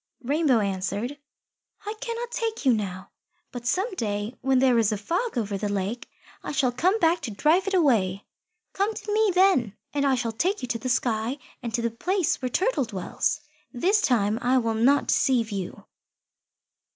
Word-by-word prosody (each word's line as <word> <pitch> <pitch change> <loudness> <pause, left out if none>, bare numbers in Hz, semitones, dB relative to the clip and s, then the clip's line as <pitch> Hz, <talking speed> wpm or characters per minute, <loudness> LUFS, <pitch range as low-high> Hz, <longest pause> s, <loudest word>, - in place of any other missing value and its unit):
Rainbow 280 -3 +2
answered, 200 +7 -2 0.7
"I 420 - -3
cannot 475 -1 -4
take 455 - -3
you 255 - +6
now. 195 -3 -4 0.4
But 245 -1 -6
some 385 - 0
day, 210 - -3
when 265 0 +2
there 255 -2 +4
is 220 -1 +2
a 210 - -1
Fog 350 - -2
over 205 -4 -2
the 210 - -2
lake, 200 +5 -3 0.3
I - - -5
shall 265 -4 +2
come 365 - +2
back 335 -3 +2
to 275 - -4
drive 310 - +2
it 390 - +1
away. 210 - +2 0.5
Come 410 +3 0
to 415 - -4
me 435 -1 +3
then, 360 - +3 0.2
and 285 -1 0
I 275 -2 +3
shall 240 -2 -2
take 365 - -1
you - - -2
to 230 - -1
the 255 - -3
sky 235 +1 0 0.2
and 235 - -4
to 235 - -1
the 235 - 0
place 360 - 0
where 255 - -1
Turtle 365 - +1
dwells. 195 -5 -2 0.3
This 380 - +2
time 220 -3 +2
I 255 +2 +3
will 230 -2 +1
not 255 +6 +3
deceive 235 -4 +2
you." 195 -3 -5
250 Hz, 185 wpm, -25 LUFS, 220-355 Hz, 0.7 s, you